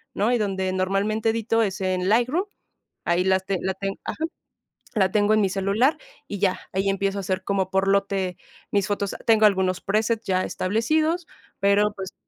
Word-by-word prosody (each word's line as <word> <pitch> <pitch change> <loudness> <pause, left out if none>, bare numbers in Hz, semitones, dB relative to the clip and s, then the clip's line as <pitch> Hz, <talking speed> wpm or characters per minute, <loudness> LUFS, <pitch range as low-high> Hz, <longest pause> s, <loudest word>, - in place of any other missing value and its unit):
¿no?, 215 +5 +1
y 245 - +3
donde 190 -2 -1
normalmente 200 +4 0
edito 225 0 0
es 195 -2 -1
en 185 -1 0
Lightroom, 255 - +2 0.6
ahí 175 +1 +2
las 190 0 +2
te 195 -2 -1
la 190 0 -1
ten 195 +1 -4
ajá, 315 - -4 0.7
la 190 -3 +3
tengo 210 +1 +3
en 215 - +4
mi 195 - +2
celular 200 +10 +1 0.3
y 205 - -4
ya, 190 -2 +1
ahí 195 +1 0
empiezo 195 0 0
a - - -2
hacer 185 0 -2
como 190 -1 -1
por 190 0 +1
lote 195 -2 +1 0.3
mis 200 -2 +2
fotos. 200 -1 -2
Tengo 220 -1 +5
algunos 190 -2 0
presets 220 +3 0
ya 185 -1 +1
establecidos, 310 - 0 0.3
pero, 200 +1 +3
pues, 190 -1 -6
195 Hz, 180 wpm, -24 LUFS, 190-215 Hz, 0.7 s, Tengo